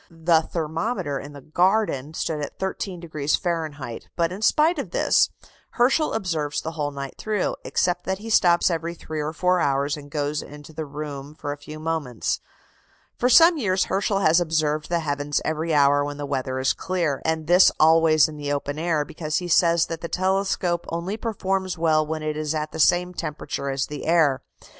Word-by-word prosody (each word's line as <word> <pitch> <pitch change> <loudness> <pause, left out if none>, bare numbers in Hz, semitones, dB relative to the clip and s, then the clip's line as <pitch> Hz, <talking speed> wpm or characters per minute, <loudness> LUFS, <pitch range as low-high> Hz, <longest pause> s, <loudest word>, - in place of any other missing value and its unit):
The 165 -1 +2
thermometer 165 - -3
in 145 +1 -9
the 140 - -10
garden 160 -2 +1
stood 155 -2 -2
at 145 - -6
13° 170 -6 -2
Fahrenheit; 155 -9 -4
but, 170 -1 +1
in 190 +3 -7
spite 310 +8 +3
of - - -4
this, - - +3 0.4
Herschel 265 +6 +2
observes 160 -8 -1
the 160 - -5
whole 150 -3 -2
night 140 -1 -7
through, 215 -3 -1
except 180 0 0
that 190 0 -1
he 225 +3 -7
stops 175 -3 +4
every 170 +1 -3
three 155 -2 -5
or 150 +1 -2
four 180 +3 +1
hours 140 -1 +1
and 145 -1 -11
goes 145 0 -2
into 150 +1 -12
the 155 -1 -5
room 145 0 -7
for 145 -2 -5
a 145 - -5
few 150 +1 -9
moments. 155 -7 -2 0.8
For 250 - +3
some 330 +5 +7
years 190 -6 +1
Herschel 195 +1 0
has 165 -1 +4
observed 155 -2 0
the 170 -1 +1
heavens 145 -1 -1
every 160 +1 -1
hour 145 -1 +4
when 145 0 -5
the 145 - -4
weather 130 -2 -2
is 130 0 +2
clear, 170 -7 -2
and 160 -1 -1
this 180 +3 +6
always 160 0 +5
in 155 -1 -9
the 145 -1 -3
open 145 +1 -3
air, 160 -3 0
because 155 0 -5
he 180 - -3
says 170 0 +4
that 165 0 -6
the 170 - -5
telescope 185 -2 0
only 170 +5 -3
performs 195 -5 -2
well 160 -1 +3
when 155 0 -4
it 155 0 -2
is 155 0 -2
at 155 0 -3
the 160 - -7
same 180 +3 +3
temperature 150 -3 -4
as 135 0 -1
the 150 -1 -7
air. 155 -5 +3
160 Hz, 190 wpm, -24 LUFS, 145-180 Hz, 0.8 s, some